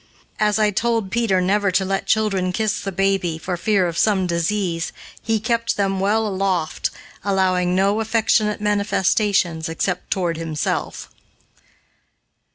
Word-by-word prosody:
As 210 0 +2
I 215 -1 +3
told 225 -1 0
Peter 225 -5 +1
never 200 +2 +2
to 190 +1 +2
let 195 +1 -2
children 195 -4 +1
kiss 215 +2 -1
the 195 - -4
baby, 195 -3 0
for 180 +3 -3
fear 195 +1 +1
of 170 -1 -3
some 200 -4 +2
disease, 170 0 -1 0.3
he 225 -1 0
kept 230 +2 -1
him 195 -1 0
well 210 +3 +1
aloft, 190 -5 -1 0.3
allowing 185 -2 +1
no 200 +3 +2
affectionate 220 -1 +1
manifestations 200 -4 +1
except 180 +2 -2
toward 175 -5 -1
himself. 160 -3 -3
195 Hz, 135 wpm, -21 LUFS, 180-210 Hz, 0.3 s, I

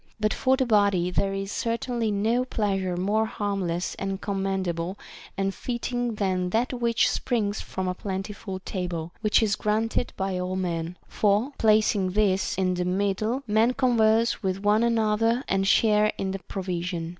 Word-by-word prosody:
But 215 0 +1
for 260 0 +2
the 260 - +1
body, 200 -6 +3
there 195 +2 0
is 195 0 -4
certainly 235 0 -1
no 220 +5 +1
pleasure 195 -7 -1
more 210 +4 +1
harmless 195 -5 -2
and 195 -1 -3
commendable 190 -3 -2 0.4
and 195 0 0
fitting 245 0 -3
than 185 -3 0
that 235 +7 0
which 235 -2 +2
springs 215 -5 -1
from 190 0 -4
a 180 - 0
plentiful 195 +1 -5
table, 175 -3 -4
— - - -39
which 215 +1 +3
is 210 -2 +2
granted 220 +4 0
by 190 -1 -1
all 180 +1 -2
men; 175 -1 -3
for, 210 +6 +1
placing 210 -4 +3
this 195 -2 +1
in 185 -1 +1
the 180 0 -1
mid 190 +2 0
die, 230 +5 -1
men 225 +3 +2
converse 230 -3 +3
with 190 -1 -2
one 210 +2 +4
another 225 +1 +2
and 195 0 +1
share 210 0 +4
in 190 -1 -2
the 195 - -4
pro 190 +1 -6
vision. 175 -2 -3
200 Hz, 170 wpm, -26 LUFS, 185-225 Hz, 0.4 s, one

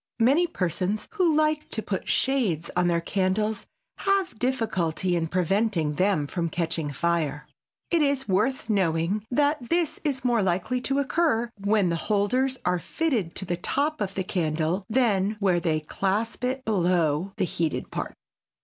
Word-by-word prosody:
Many 280 +10 +4
persons 185 - -1
who 360 -7 +2
like 305 0 +1
to 220 - -3
put 190 - -3
shades 220 - +1
on 180 0 +2
their 170 -1 +2
candles 200 +4 -1 0.3
have 390 - 0
difficulty 190 -9 0
in 165 -1 0
preventing 185 -2 +1
them 185 -2 +1
from 170 +3 -2
catching 160 -2 -2
fire. 150 -1 -1 0.4
It 340 -2 +3
is 280 -2 +1
worth 215 +6 +1
knowing 190 -1 +1
that 285 -1 +1
this 340 -2 +1
is 270 -4 -2
more 240 -3 +3
likely 190 +7 0
to 270 +2 -1
occur 280 -5 +1
when 205 -3 +3
the 170 - 0
holders 225 +8 +1
are 180 0 +2
fitted 235 - -1
to 190 - -2
the 175 -1 -2
top 290 - -1
of 195 -1 -2
the 190 - -1
candle 170 +1 -1
than 215 -4 +2
where 185 -4 +2
they 160 -2 0
clasp 200 +9 -2
it 260 +1 -2
below 180 -3 +1
the - - +1
heated 165 -2 -2
part. - - -4
200 Hz, 160 wpm, -26 LUFS, 175-255 Hz, 0.4 s, Many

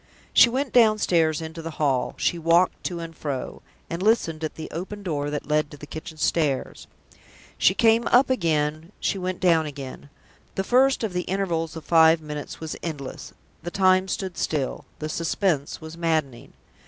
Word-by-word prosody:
She 235 - +8
went 265 +3 -2
downstairs 185 -9 +3
into 160 +1 -7
the 165 - -5
hall; 135 -4 0
she 170 - 0
walked 170 +2 +2
to 175 -2 -3
and 165 -1 -7
fro, 140 -5 -5 0.3
and 170 +2 -5
listened 175 -7 +1
at 155 - -3
the 160 - -6
open 195 +5 -6
door 145 -5 -2
that 150 0 -4
led 150 0 +1
to 145 - -11
the 150 - -10
kitchen 155 +1 -8
stairs. 155 -3 -1 0.7
She 190 - +4
came 225 +1 +4
up 250 +3 +5
again; 160 -4 0
she 195 - -1
went 185 0 -3
down 165 -4 +3
again. 140 -1 -8 0.5
The 195 - 0
first 255 +4 +3
of 210 -4 -2
the 180 - 0
intervals 170 -4 -1
of 160 - -8
five 160 -1 +6
minutes 150 -2 -7
was 160 -1 -5
endless. 145 -5 -6 0.3
The 175 - -5
time 185 0 +3
stood 190 -1 -4
still. 145 -4 -2
The 155 - -4
suspense 165 -2 -1
was 160 +1 -9
maddening. 160 -7 -2
165 Hz, 175 wpm, -24 LUFS, 155-185 Hz, 0.7 s, She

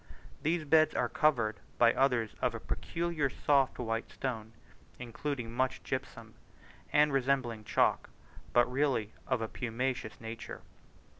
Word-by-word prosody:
These 160 +1 0
beds 155 +1 +4
are - - +2
covered 120 -8 +2 0.2
by 115 -1 +6
others 125 -5 +2
of - - +1
a - - -4
peculiar 165 -4 -2
soft 135 -1 +2
white 115 -1 -2
stone, 115 -4 -4 0.4
including 125 0 -4
much 130 +1 0
gypsum, 130 -4 -5 0.6
and 150 -1 +4
resembling 130 -4 +1
chalk, - - +2 0.4
but 120 - +5
really 125 -5 0
of 125 -4 0
a - - -2
pumiceous 120 -1 -3
nature. 115 0 -7
125 Hz, 130 wpm, -32 LUFS, 115-140 Hz, 0.6 s, by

